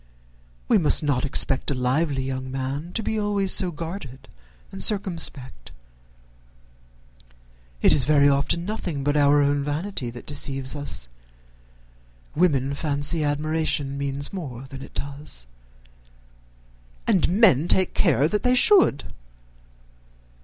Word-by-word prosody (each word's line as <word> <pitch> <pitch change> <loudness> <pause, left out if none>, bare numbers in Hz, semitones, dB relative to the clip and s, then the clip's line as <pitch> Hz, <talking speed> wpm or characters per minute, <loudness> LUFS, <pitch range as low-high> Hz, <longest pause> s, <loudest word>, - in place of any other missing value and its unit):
We - - +4
must 155 -1 +3
not 140 -3 0
expect 135 -1 0
a 140 - -1
lively 135 +2 0
young 130 0 -5
man 135 +5 -4
to 225 - -2
be 220 +1 -2
always 205 -2 0
so 185 - +4
guarded 160 -5 -8 0.4
and 95 - -6
circumspect. 165 - 0 2.1
It - - +6
is 135 - +4
very 145 -1 +4
often 140 +5 0
nothing 180 -9 -4
but 145 +1 0
our 145 0 +4
own 140 0 0
vanity 150 -2 -4
that 120 +1 -11
deceives 135 -2 -3
us. 145 - -4 1.3
Women 140 -5 +1
fancy 145 +2 -1
admiration 150 -1 -1
means 140 +2 -2
more 135 -10 -7
than 135 0 -10
it - - -12
does." 140 - -5 1.6
"And 185 - +2
men 180 - +4
take 185 +1 +2
care 150 - +2
that 210 +5 -1
they 250 0 +2
should." 305 - +5
145 Hz, 125 wpm, -23 LUFS, 135-170 Hz, 2.1 s, It